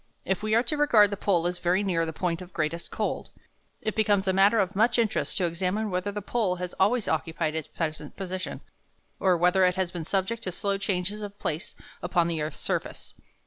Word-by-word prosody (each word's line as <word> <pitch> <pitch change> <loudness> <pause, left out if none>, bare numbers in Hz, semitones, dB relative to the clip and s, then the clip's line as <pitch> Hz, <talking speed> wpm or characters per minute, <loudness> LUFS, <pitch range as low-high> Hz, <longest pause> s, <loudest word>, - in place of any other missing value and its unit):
If 190 +2 0
we 215 0 +1
are 230 - +4
to 300 - -1
regard 220 -9 +5
the - - -1
pole 185 -4 +1
as 175 0 -1
very 180 +3 +2
near 165 -4 +1
the - - -2
point 170 +1 -2
of 180 0 -11
greatest 165 +1 -2
cold, - - -2 0.5
it 215 - -1
becomes 205 -3 +2
a 190 - +3
matter 200 +4 +5
of 190 -1 0
much 225 +5 +3
interest 225 -3 +1
to 185 - +2
examine 185 +5 -1
whether 185 +2 -1
the 205 0 -5
pole 210 -5 0
has 180 0 -5
always 215 +4 +3
occupied 160 0 -1
its 160 -2 -3
present 155 -3 -4
position, 185 -1 -5 0.6
or 185 -2 +3
whether 180 +2 +4
it 180 0 +4
has 185 -2 -1
been 170 -2 -4
subject 195 +7 -1
to 185 - -2
slow 200 +2 -1
changes 195 +1 -1
of 205 -1 -7
place 160 -3 -3 0.3
upon 175 -1 +2
the 165 -2 -1
earth's 150 0 -3
surface. - - -3
185 Hz, 215 wpm, -27 LUFS, 175-205 Hz, 0.6 s, regard